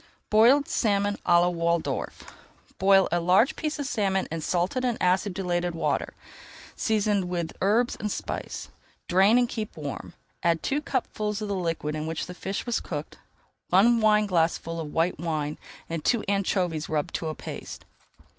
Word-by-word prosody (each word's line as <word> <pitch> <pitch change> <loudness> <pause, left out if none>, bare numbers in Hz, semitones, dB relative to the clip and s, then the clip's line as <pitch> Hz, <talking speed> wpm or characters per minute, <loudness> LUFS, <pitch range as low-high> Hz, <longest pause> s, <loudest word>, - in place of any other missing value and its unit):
BOILED 245 +7 +5
SALMON 205 -2 +1
À 175 0 +6
LA 175 - +3
WALDORF 170 -1 -1 0.6
Boil 195 0 +5
a 175 - +2
large 180 +8 +3
piece 305 -1 -3
of 285 - -3
salmon 195 -7 0
in 165 0 -3
salted 180 - 0
and 245 -3 0
acidulated 180 -2 0
water, 165 - -1 0.6
seasoned 210 -3 +1
with 170 -2 -3
herbs 225 +5 +2
and 210 -1 -2
spice. - - -5 0.4
Drain 195 +6 +5
and 245 -1 +3
keep 220 -5 -5
warm. 145 -3 -6 0.3
Add 165 -1 +1
two 290 +2 0
cupfuls 215 -7 -2
of 210 - -4
the - - 0
liquid 165 -4 -2
in 155 0 -3
which 160 0 -3
the 180 - -8
fish 195 +2 -4
was 240 -2 0
cooked, 150 -2 -6 0.5
one 230 +6 +5
wineglassful 180 -6 +2
of 155 -2 -5
white 165 0 0
wine, 155 -3 -2 0.3
and 165 -2 -4
two 235 -3 +2
anchovies 185 -5 0
rubbed 150 -2 -1
to 165 - -2
a 155 - -3
paste. - - -8
185 Hz, 160 wpm, -26 LUFS, 165-215 Hz, 0.6 s, À